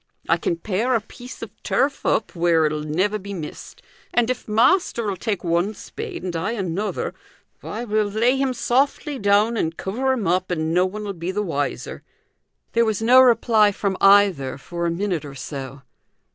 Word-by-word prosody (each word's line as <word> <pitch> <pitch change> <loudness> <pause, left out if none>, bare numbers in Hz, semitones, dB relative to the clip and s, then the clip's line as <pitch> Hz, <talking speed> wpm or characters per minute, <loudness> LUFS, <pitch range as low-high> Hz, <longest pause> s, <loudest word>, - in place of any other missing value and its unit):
I 165 - +3
can 170 - -1
pare 215 +8 -1
a - - +3
piece 245 +3 -11
of 220 - -7
turf 280 +1 0
up 215 - 0
where 165 -2 +3
it'll 155 0 -1
never 185 +8 0
be 200 +1 -7
missed, 155 -4 -8 0.3
and 240 0 +2
if 255 - -5
master'll 230 - +2
take 205 +2 -3
one 175 +5 0
spade, - - -7
and 180 -2 -4
I 165 +7 -1
another, 195 -1 -3 0.5
why 225 +3 -6
we'll 215 -2 +1
lay 230 +5 +2
him 270 -1 0
softly 275 +3 0
down, 205 +3 +3
and 165 -4 -1
cover 250 +8 -1
him 245 -6 -1
up, 185 +1 +1
and 160 -2 -1
no 180 +2 +3
one'll 205 +1 -5
be 170 0 -5
the 205 +2 -1
wiser." 145 -7 -3 0.7
There 235 - +3
was 220 -1 -1
no 250 +3 +7
reply 230 -4 +4
from 195 -1 -2
either 195 -10 +4
for 170 +4 -4
a - - +1
minute 175 -1 -2
or 140 -2 -9
so. 135 0 -7
200 Hz, 180 wpm, -22 LUFS, 170-230 Hz, 0.7 s, no